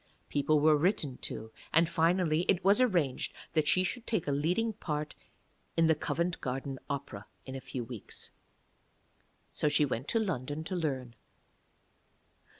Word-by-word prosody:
People 150 Hz, +1 st, +2 dB
were 155 Hz, +1 st, +6 dB
written 150 Hz, -5 st, +1 dB
to, 110 Hz, +1 st, -5 dB, 0.2 s
and 165 Hz, +1 st, +5 dB
finally 165 Hz, -1 st, +2 dB
it 190 Hz, -1 st, +3 dB
was 200 Hz, +5 st, +6 dB
arranged 175 Hz, -, +1 dB, 0.2 s
that 155 Hz, -2 st, +2 dB
she 185 Hz, -, +4 dB
should 235 Hz, +6 st, -3 dB
take 215 Hz, -9 st, -1 dB
a -, -, +1 dB
leading 180 Hz, +11 st, +1 dB
part 150 Hz, -7 st, -3 dB, 0.6 s
in 165 Hz, -, +5 dB
the 160 Hz, -, +5 dB
Covent 170 Hz, +3 st, -1 dB
Garden 135 Hz, +1 st, -3 dB
Opera 135 Hz, -8 st, -5 dB, 0.2 s
in 130 Hz, -, -7 dB
a 135 Hz, -, -5 dB
few 125 Hz, -1 st, -5 dB
weeks. 115 Hz, -3 st, -9 dB, 1.2 s
So 150 Hz, -, +1 dB
she 145 Hz, 0 st, +4 dB
went 130 Hz, 0 st, -3 dB
to 225 Hz, -, +2 dB
London 155 Hz, -, -2 dB
to 185 Hz, +3 st, -4 dB
learn. 135 Hz, -8 st, -2 dB
155 Hz, 150 wpm, -31 LUFS, 135-180 Hz, 1.2 s, were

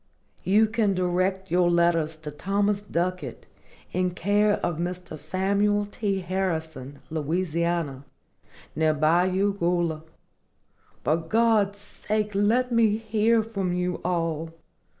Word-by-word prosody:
You 210 Hz, +4 st, +4 dB
can 215 Hz, -3 st, +1 dB
direct 185 Hz, +1 st, 0 dB
your 175 Hz, 0 st, +3 dB
letters 170 Hz, -2 st, +2 dB
to 155 Hz, -1 st, -8 dB
Thomas 200 Hz, +6 st, 0 dB
Ducket, 180 Hz, -, -3 dB, 0.5 s
in 180 Hz, 0 st, 0 dB
care 205 Hz, +3 st, +2 dB
of 165 Hz, -2 st, -2 dB
Mr. 180 Hz, -1 st, -4 dB
Samuel 200 Hz, +6 st, 0 dB
T. 200 Hz, -3 st, -1 dB
Harrison, 160 Hz, -7 st, -3 dB
Louisiana, 165 Hz, -2 st, -1 dB, 0.7 s
near 155 Hz, -1 st, +2 dB
Bayou 180 Hz, +6 st, +2 dB
Goula. 170 Hz, -4 st, 0 dB, 1.0 s
For 155 Hz, -, +2 dB
God's 205 Hz, +3 st, +2 dB
sake 210 Hz, +1 st, -3 dB
let 225 Hz, +6 st, +2 dB
me 225 Hz, -3 st, +3 dB
hear 225 Hz, 0 st, +2 dB
from 195 Hz, -5 st, -2 dB
you 180 Hz, 0 st, -2 dB
all. 165 Hz, -2 st, -2 dB
180 Hz, 110 wpm, -25 LUFS, 165-205 Hz, 1.0 s, You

